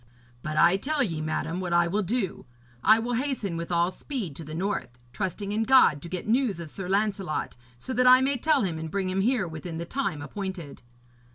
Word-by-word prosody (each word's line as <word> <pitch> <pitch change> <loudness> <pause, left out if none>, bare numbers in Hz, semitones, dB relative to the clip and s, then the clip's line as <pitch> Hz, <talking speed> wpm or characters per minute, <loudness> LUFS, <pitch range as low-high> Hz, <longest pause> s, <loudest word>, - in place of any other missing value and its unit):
But 155 +2 -4
I 175 +4 +5
tell 285 +6 0
ye, 165 -9 -2
madam, 155 +2 -2
what 180 -2 -2
I 170 0 +4
will 200 +5 0
do. 205 -1 -2 0.4
I 220 - +7
will 240 +2 -2
hasten 245 -8 -2
with 170 +1 -5
all 170 +1 +2
speed 205 - -5
to 165 - -7
the 155 +1 -7
north, 175 -9 -3 0.2
trusting 200 +3 -3
in 215 +2 0
God 225 - +5
to 170 - -8
get 180 +2 -5
news 230 -5 +1
of 165 -3 -7
Sir 190 -2 -5
Lancelot, 200 -4 -1 0.2
so 255 - -5
that 250 0 +3
I 255 0 +9
may 270 +1 +1
tell 300 -2 +3
him 165 -4 -2
and 160 0 -5
bring 190 +1 -1
him 190 +1 0
here 225 -3 +1
within 160 +1 -6
the 170 - -4
time 175 - -2
appointed.' 190 -4 -6
190 Hz, 215 wpm, -27 LUFS, 170-230 Hz, 0.4 s, I